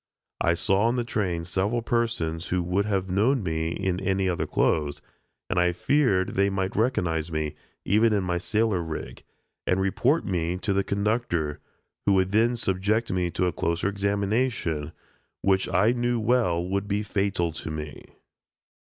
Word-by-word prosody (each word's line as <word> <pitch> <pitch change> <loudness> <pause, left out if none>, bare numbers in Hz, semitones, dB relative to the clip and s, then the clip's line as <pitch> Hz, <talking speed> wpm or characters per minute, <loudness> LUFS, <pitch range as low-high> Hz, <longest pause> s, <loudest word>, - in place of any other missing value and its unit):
I 85 - +3
saw 100 +5 +2
on 120 - +1
the 120 - 0
train 90 -7 -2
several 100 +6 -1
persons 115 -10 -1
who 90 -1 0
would 90 +4 0
have 95 -2 0
known 110 +7 +2
me 80 -2 -1
in 90 +2 -1
any 95 0 0
other 90 -2 -1
clothes, 75 -2 +1 0.5
and 95 - 0
I 90 0 +3
feared 100 - +2
they 100 +1 +2
might 95 -1 -2
recognize 85 -9 0
me, 80 -1 -2 0.3
even 110 +3 +4
in 100 -2 +1
my 90 -1 -1
sailor 110 -1 +1
"rig," 80 -2 -6 0.5
and 90 - +2
report 125 - +1
me 90 -2 -1
to 100 +2 -1
the 100 0 +2
conductor, 100 -8 -1 0.5
who 100 - +5
would 95 0 +2
then 115 +3 +3
subject 105 +2 0
me 90 -1 0
to 90 - 0
a 90 - 0
closer 85 +4 0
examination, 100 - -1 0.5
which 95 -1 +2
I 105 +5 +4
knew 120 -1 0
well 110 -7 +2
would 100 +2 -1
be 105 +1 0
fatal 100 -5 0
to 80 - -7
me. 75 -1 -6
95 Hz, 165 wpm, -26 LUFS, 85-110 Hz, 0.5 s, who